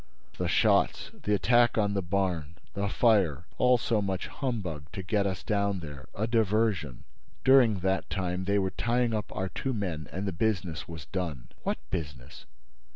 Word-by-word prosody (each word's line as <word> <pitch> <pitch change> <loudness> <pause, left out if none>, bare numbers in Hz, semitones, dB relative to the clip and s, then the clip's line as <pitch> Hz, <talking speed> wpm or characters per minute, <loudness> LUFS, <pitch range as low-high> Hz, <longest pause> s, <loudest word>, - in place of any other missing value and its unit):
"The - - 0
shots—the 105 - +1
attack 120 +5 +4
on 105 -2 +2
the 100 - 0
barn—the 90 +1 -2
fire—all 105 - +3
so 115 -2 0
much 95 -2 -2
humbug 90 - -4
to 95 - -5
get 100 +2 +1
us 95 -1 -3
down 100 -3 0
there—a 75 +7 -5
diversion. 110 - +1 0.4
During 125 -7 +6
that 95 +1 0
time 90 -1 -2
they 100 +1 +2
were 95 -1 +1
tying 120 0 +1
up 105 -2 -2
our 95 0 -2
two 130 +9 -3
men 85 -7 -3
and 95 +3 -3
the - - 0
business 90 -3 -1
was 80 -3 -8
done." 85 -10 -4
"What - - -1
business?" 70 -6 -6
95 Hz, 155 wpm, -29 LUFS, 85-110 Hz, 0.4 s, During